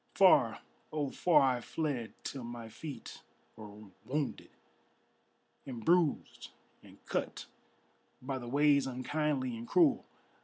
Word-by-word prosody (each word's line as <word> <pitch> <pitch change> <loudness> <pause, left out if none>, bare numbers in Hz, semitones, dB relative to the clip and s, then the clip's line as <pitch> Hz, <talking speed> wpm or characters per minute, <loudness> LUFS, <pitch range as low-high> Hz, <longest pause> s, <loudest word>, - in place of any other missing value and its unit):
Far, - - +5 0.3
oh 145 -3 -2
far 155 -5 +4
I - - -7
fled 140 -6 -3
till 135 -3 -5
my 120 -1 -7
feet 145 +6 -9 0.3
were 105 0 -11 0.2
wounded 140 +4 -3 1.2
And 120 -4 -7
bruised 170 -3 +1 0.3
and - - -16
cut - - -3 0.7
by 130 +1 -4
the 120 - -8
ways 140 0 +4
unkindly 130 0 -1
and 115 +1 -8
cruel. 315 -7 +4
135 Hz, 115 wpm, -32 LUFS, 120-150 Hz, 1.2 s, Far